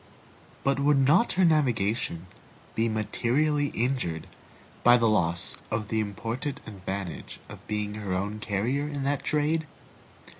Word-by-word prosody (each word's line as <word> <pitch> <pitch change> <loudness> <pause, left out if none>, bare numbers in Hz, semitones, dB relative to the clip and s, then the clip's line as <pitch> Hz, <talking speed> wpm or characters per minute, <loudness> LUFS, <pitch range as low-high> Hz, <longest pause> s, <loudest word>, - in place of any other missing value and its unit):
But 135 0 +2
would 145 0 +4
not 150 - +4
her 185 0 +4
navigation 115 - +1 0.5
be 115 +1 +1
materially 130 +7 +1
injured 120 - -1 0.6
by 120 0 +8
the 115 - +2
loss 85 -5 +1
of 105 -1 -2
the 110 - +1
important 115 +6 -3
advantage 95 -5 -6
of - - -12
being 105 -1 -2
her 105 -3 -5
own 100 +3 -2
carrier 115 +8 -1
in 145 -2 -3
that 140 0 0
trade? 155 +1 +1
115 Hz, 135 wpm, -27 LUFS, 105-140 Hz, 0.6 s, by